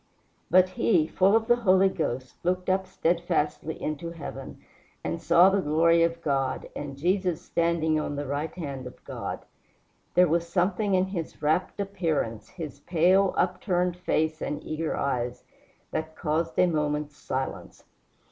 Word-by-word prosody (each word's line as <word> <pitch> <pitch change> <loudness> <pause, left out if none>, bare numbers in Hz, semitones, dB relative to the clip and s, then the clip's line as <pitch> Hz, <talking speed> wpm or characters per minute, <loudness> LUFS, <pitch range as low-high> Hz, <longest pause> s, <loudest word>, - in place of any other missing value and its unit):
"But 185 +1 +5
he, 180 -3 +2
full 190 +5 +3
of 225 0 +3
the 240 +1 +4
Holy 190 -4 +4
Ghost, 130 -8 -3
looked 185 +1 0
up 190 0 0
steadfastly 165 -3 -1
into 155 +2 -3
heaven 170 -1 -8 0.4
and 165 - -3
saw 175 +3 +6
the 195 0 +2
glory 165 +2 +3
of 170 0 0
God, 135 -3 -1
and 140 -2 -6
Jesus 180 +2 +1
standing 165 -2 +1
on 145 -1 -3
the 145 +1 -3
right 145 +3 -2
hand 140 -7 -5
of 125 - -13
God." - - -6 0.7
There 180 0 +6
was 170 +1 +1
something 190 +3 +1
in 185 0 +3
his 180 -6 -6
rapt 160 +7 +1
appearance, 165 - -2
his 155 -6 -8
pale, 180 +5 +3
upturned 180 -1 +1
face 160 -3 -1
and 150 - -3
eager 155 +1 -3
eyes, 125 -3 -2 0.5
that 160 0 -3
caused 160 +1 -1
a - - +6
moment's 150 -3 -1
silence. 130 -1 -5
170 Hz, 150 wpm, -27 LUFS, 150-185 Hz, 0.7 s, saw